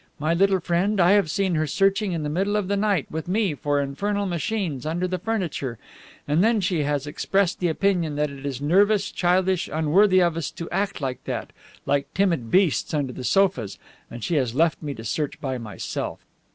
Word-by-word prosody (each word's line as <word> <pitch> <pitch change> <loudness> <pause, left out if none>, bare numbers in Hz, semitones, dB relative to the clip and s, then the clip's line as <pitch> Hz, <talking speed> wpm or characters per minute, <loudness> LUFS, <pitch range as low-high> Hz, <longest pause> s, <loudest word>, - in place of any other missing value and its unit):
My 155 +3 0
little 190 +2 +3
friend, 180 +4 0
I 175 +1 +5
have 200 -5 +4
seen 190 +2 0
her 155 -1 +1
searching 195 +5 +1
in 165 -3 -2
the - - -2
middle 195 +7 0
of 210 -3 0
the 200 - 0
night, 200 -6 +1
with 160 +2 -4
me, 195 -2 +1
for 145 0 -1
infernal 200 +9 -1
machines 175 - -2
under 170 +4 -1
the 185 0 -3
furniture, 180 - -3 0.5
and 150 +5 +3
then 225 0 +3
she 180 -4 0
has 145 -1 -1
expressed 195 +5 0
the 180 - +1
opinion 170 -2 0
that 150 0 0
it 140 -1 -10
is 135 -3 -3
nervous, 200 +7 +3
childish, 185 0 +1
unworthy 185 +5 +4
of 170 -2 +2
us 165 - -2
to 165 - -7
act 195 -1 -1
like 130 -3 -3
that, - - -4 0.3
like 140 0 0
timid 170 - +1
beasts 180 - +2
under 140 -4 -1
the 130 - -7
sofas, 130 - +1 0.3
and 120 -1 -8
she 170 - 0
has 125 -4 0
left 165 +2 +2
me 145 -3 -4
to 110 - -9
search 140 +6 -3
by 130 -2 -3
myself. 110 -4 -5
170 Hz, 205 wpm, -24 LUFS, 145-195 Hz, 0.5 s, I